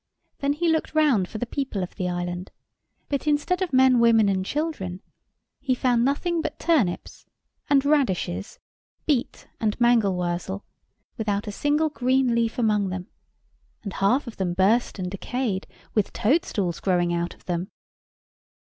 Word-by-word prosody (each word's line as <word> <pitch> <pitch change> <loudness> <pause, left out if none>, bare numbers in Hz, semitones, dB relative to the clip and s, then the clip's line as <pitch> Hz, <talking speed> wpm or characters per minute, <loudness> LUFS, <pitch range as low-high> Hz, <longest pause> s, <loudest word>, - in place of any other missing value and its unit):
Then 280 0 +1
he 340 +4 -1
looked 320 -1 0
round 265 -12 +3
for - - -6
the 245 - -2
people 245 -6 -3
of 180 - -6
the 180 -2 -2
island: 175 +1 -3 0.6
but 280 +1 -2
instead 300 +5 +1
of 370 - -1
men, 260 -1 +5
women, 225 -3 +5
and 190 -1 0
children, 195 - -3 0.6
he 265 -2 0
found 245 -2 +2
nothing 325 +6 0
but - - -4
turnips 270 - 0 0.4
and 280 -1 +4
radishes, 195 - 0 0.5
beet 275 -6 -1
and 215 0 -1
mangold 230 -6 +3
wurzel, 180 +3 -3 0.5
without 205 -2 -1
a 210 - -4
single 295 +8 +1
green 260 -3 +2
leaf 230 +1 0
among 210 -4 +2
them, 185 0 -5 0.7
and 200 -4 -5
half 220 +9 +2
of 235 - -9
them 180 -2 -1
burst 215 +7 +2
and 180 -2 -4
decayed, 205 0 -2 0.3
with 210 -3 +1
toad 285 +11 +2
stools 180 -5 -2
growing 175 -2 +1
out 170 0 -2
of - - -27
them. 175 +2 -2
225 Hz, 160 wpm, -25 LUFS, 190-275 Hz, 0.7 s, men